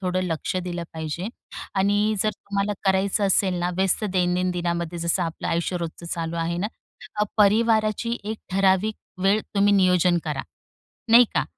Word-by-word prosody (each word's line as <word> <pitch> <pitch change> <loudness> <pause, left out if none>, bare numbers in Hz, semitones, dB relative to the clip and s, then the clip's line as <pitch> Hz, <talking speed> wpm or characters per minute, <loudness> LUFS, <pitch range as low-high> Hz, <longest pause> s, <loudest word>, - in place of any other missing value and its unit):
थोडं 185 -1 -1
लक्ष 165 +1 -2
दिलं 175 -1 -3
पाहिजे 160 +4 -4 0.5
आणि 205 +2 +2
जर 215 - +1
तुम्हाला 200 0 -3
करायचं 195 +2 +2
असेल 190 -1 +3
ना 175 +1 0
व्यस्त 190 +3 +1
दैनंदिनमध्ये, 180 -2 -1
जसं 170 +2 +1
आपलं 165 -1 -4
आयुष्य 170 +2 -1
रोजचं 170 0 -6
चालू 170 0 -3
आहे 170 +1 -2
ना, 195 - 0 0.7
परिवाराची 220 +2 +3
एक 215 +1 -4
ठराविक 195 +2 +2 0.3
वेळ 200 +3 +3
तुम्ही 205 0 +4
नियोजन 180 -2 +3
करा, 150 -4 -3 0.7
नाही 240 +1 +9
का - - +2
185 Hz, 145 wpm, -24 LUFS, 175-205 Hz, 0.7 s, नाही